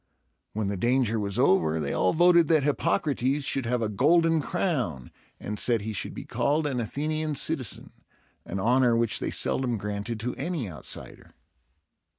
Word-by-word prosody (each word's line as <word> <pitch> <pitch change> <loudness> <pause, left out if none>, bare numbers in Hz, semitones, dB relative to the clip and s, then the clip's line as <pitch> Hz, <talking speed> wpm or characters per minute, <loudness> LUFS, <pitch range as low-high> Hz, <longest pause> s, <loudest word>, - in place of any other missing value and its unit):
When 110 -1 -2
the 100 - -3
danger 120 +1 +1
was 100 -2 -2
over, 80 -4 +3
they 70 -2 -2
all 95 - +2
voted 170 -1 +5
that 155 -3 +3
Hippocrates 140 0 0
should 135 -3 0
have 120 -1 0
a - - 0
golden 165 - +3
crown, 125 - -2 0.3
and 105 0 -5
said 115 -3 +2
he 110 +1 -4
should 100 - -4
be - - -7
called 150 +2 0
an 135 -4 -1
Athenian 155 +6 -2
citizen, 135 -5 -2 0.5
an 95 - -5
honor 120 +2 +3
which 115 -1 +1
they - - -2
seldom 125 -3 -1
granted 105 +2 -4
to 125 +2 -2
any 150 - -3
outsider. 80 -8 -7
125 Hz, 165 wpm, -26 LUFS, 105-150 Hz, 0.5 s, voted